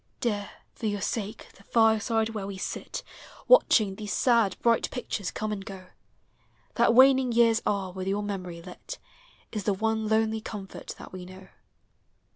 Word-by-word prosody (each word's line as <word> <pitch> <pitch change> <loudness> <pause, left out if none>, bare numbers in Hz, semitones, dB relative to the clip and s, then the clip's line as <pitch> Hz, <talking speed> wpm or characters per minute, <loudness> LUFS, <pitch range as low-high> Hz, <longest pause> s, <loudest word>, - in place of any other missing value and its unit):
Dear 205 -4 -1 0.2
for 225 - -4
your 205 -1 -1
sake 210 +2 -4
the 195 - -18
fireside 225 0 +2
where 210 -3 -5
we 200 -1 -6
sit - - -5 0.4
Watching 215 - +5
these 210 +1 -6
sad, 230 -6 +3
bright 235 -1 +3
pictures 225 -6 -4
come 215 0 -4
and 200 -2 -4
go; 190 -2 -10 0.8
That 230 - +3
waning 260 -1 +6
years 230 0 +4
are 195 -2 -1
with 185 0 -6
your 200 +2 0
memory 180 -4 -5
lit 345 - -9 0.5
Is 210 -3 -4
the 205 - +2
one 220 +2 -1
lonely 220 0 +1
comfort 200 -3 -8
that - - -11
we 185 -1 -7
know. 185 +1 -13
210 Hz, 160 wpm, -27 LUFS, 195-225 Hz, 0.8 s, waning